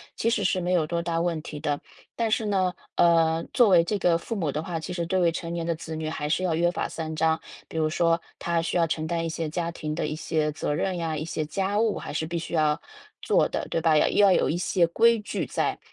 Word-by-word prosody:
其 230 - +1
实 210 -3 0
是 185 0 +1
没 175 +1 -1
有 175 -4 +3
多 170 0 -1
大 170 -1 -1
问 170 -2 -1
题 150 -1 -7
的。 145 -1 -2 0.3
但 230 -1 0
是 220 0 +1
呢， 190 -3 +1 0.2
呃， 165 -1 +4
作 240 -4 +5
为 175 -3 +6
这 205 +5 -1
个 175 -3 +3
父 230 - -5
母 165 -8 -1
的 150 - -2
话， 165 0 -4
其 180 +3 -6
实 175 - -2
对 180 0 +2
于 165 - +3
成 165 +1 -5
年 170 -1 -3
的 170 0 0
子 160 0 -7
女 155 0 -3
还 150 -2 -3
是 185 +4 +1
要 175 - +1
约 170 +2 +2
法 - - -2
三 160 -1 -5
章。 160 0 +1 0.3
比 - - -13
如 155 -1 +1
说 165 +1 +2 0.2
她 170 -1 0
需 170 - -1
要 170 - +4
承 160 0 -2
担 165 0 -1
一 - - -1
些 160 -1 -3
家 170 +1 -2
庭 155 -2 -4
的 160 - -1
一 150 - -3
些 155 -1 -1
责 150 0 -2
任 185 +5 -1
呀， 165 -2 -2
一 155 - -3
些 155 -1 -2
家 195 +6 -1
务 220 -2 +1
还 - - -6
是 160 +1 -2
必 170 +1 -3
须 165 - -6
要 155 -2 +2 0.4
做 - - +2
的， - - -3
对 165 - 0
吧？ 160 -2 +4
要 - - +4
要 200 -2 +5
有 - - +3
一 165 - 0
些 175 0 +2
规 230 +6 +4
矩 200 -5 -3
在。 - - -1
165 Hz, 290 characters per minute, -26 LUFS, 160-180 Hz, 0.4 s, 为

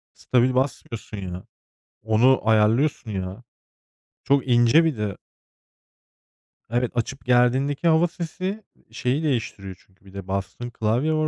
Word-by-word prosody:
Stabil 125 0 +1
basmıyorsun, 115 -5 -3
ya. 90 -1 -6 0.6
Onu 115 +4 +4
ayarlıyorsun, 110 +3 +2
ya. 95 +4 -5 0.8
Çok 140 -1 +2
ince 120 +7 +5
bir 155 -7 0
de. 105 -2 -3 1.5
Evet, 120 +1 0
açıp 130 +4 -3
gerdiğindeki 130 +6 +2
hava 165 +2 +4
sesi 185 +5 -5 0.3
şeyi 125 +7 -1
değiştiriyor 105 -9 -3
çünkü. 95 +1 -30
Bir 95 - -16
de 100 -1 -8
bastığın 100 +5 -4
klavye 120 +8 0
var 155 0 +1
120 Hz, 120 wpm, -23 LUFS, 105-140 Hz, 1.5 s, ince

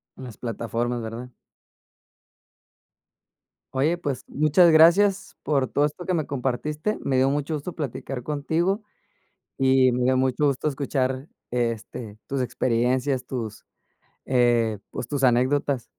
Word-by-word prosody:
En 130 - -10
las 115 -5 -10
plataformas, 120 0 -3
¿verdad? 115 +3 -6 2.4
Oye, 150 +6 +1
pues, 140 -6 -4
muchas 155 +4 +4
gracias 175 +5 +5
por 140 -4 +1
todo 145 - +1
esto 150 +4 -5
que 185 - 0
me 160 -4 0
compartiste. 145 - -2
Me 130 - 0
dio 130 +1 +4
mucho 145 +2 -1
gusto 150 +4 -5
platicar 130 -3 -5
contigo 160 - 0 0.8
y 130 -1 +4
me 125 +1 0
dio 130 0 +3
mucho 130 +3 +2
gusto 140 +2 -1
escuchar, 135 -1 -1 0.2
este, 115 -2 -3
tus 135 -1 -2
experiencias, 125 +2 0
tus, 120 -5 -5 0.6
eh, 120 -4 +2
pues, 120 - -5
tus 140 -2 -2
anécdotas. 130 +1 +2
130 Hz, 130 wpm, -24 LUFS, 125-150 Hz, 2.4 s, gracias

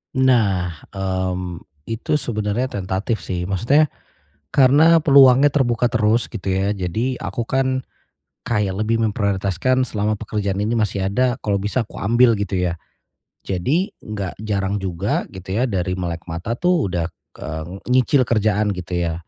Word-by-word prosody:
Nah, 100 - +2 0.2
mmm, 95 -2 -2 0.2
itu 115 +6 -2
sebenernya 110 -1 -1
tentatif 95 +4 -2
sih. 90 +1 -4
Maksudnya 115 - +2 0.6
karena 150 +5 +6
peluangnya 140 0 +6
terbuka 120 -4 +2
terus 115 0 +2
gitu 95 -4 -3
ya, 95 +2 +1
jadi 110 +8 -2
aku 120 - -3
kan 130 -1 0 0.6
kayak 105 -5 0
lebih 115 +1 +1
memprioritaskan 100 +4 0
selama 105 -2 -1
pekerjaan 100 -2 -3
ini 105 +3 0
masih 100 -3 0
ada, 125 +2 +1
kalau 100 -2 +1
bisa 105 +4 -1
aku - - -14
ambil 120 +2 +4
gitu 100 -1 -2
ya. 90 -2 0 0.7
Jadi 140 - 0 0.2
enggak 100 -4 -4
jarang 100 -2 -1
juga 95 +1 -2
gitu 95 0 -10
ya 125 - +2
dari 95 -5 -1
melek 85 -2 -4
mata 85 +7 -3
tuh 170 - +1
udah, 85 -2 -2 0.3
eee, 80 0 -5 0.3
nyicil 130 +2 +4
kerjaan 105 -2 +1
gitu 90 -1 -7
ya. 85 -1 0
105 Hz, 145 wpm, -21 LUFS, 95-125 Hz, 0.7 s, karena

